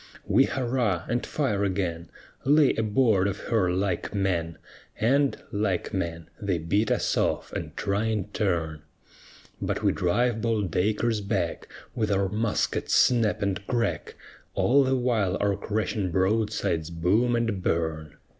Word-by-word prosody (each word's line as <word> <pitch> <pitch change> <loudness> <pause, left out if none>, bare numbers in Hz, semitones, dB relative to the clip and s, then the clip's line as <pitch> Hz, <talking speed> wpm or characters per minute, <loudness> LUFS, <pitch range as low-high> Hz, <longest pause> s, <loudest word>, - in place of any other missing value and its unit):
_ - - -19 0.2
We - - +4
hurrah, 120 -8 -1
and 120 0 -1
fire 115 -10 -1
again, 90 -4 -2 0.3
Lay 145 +1 +5
aboard 110 -3 +2
of 100 0 -2
her 100 -6 +2
like 95 +2 -1
men, 85 -4 -1 0.4
And, 140 +5 +2
like 100 -1 -1
men, 85 -4 -3
they 100 -4 0
beat 100 +7 0
us - - +1
off, - - -1
and 75 -3 -5
try 100 +2 0
in 110 -3 0
turn; 80 -6 -1 0.8
But - - -2
we - - +4
drive 110 +6 +1
bold 110 -6 0
Dacres 105 +5 +1
back 100 -4 -2 0.3
With 110 -3 -1
our 100 -1 +1
muskets' 105 +2 0
snap 115 -5 +3
and 100 0 -1
crack 115 - -1 0.4
All 140 +3 +4
the 130 0 +1
while 115 -7 +1
our 100 -1 +1
crashing 105 -1 -2
broadsides 95 -4 0
boom 95 +9 +2
and 115 -5 -1
burn. 80 -3 -2
100 Hz, 145 wpm, -26 LUFS, 90-115 Hz, 0.8 s, Lay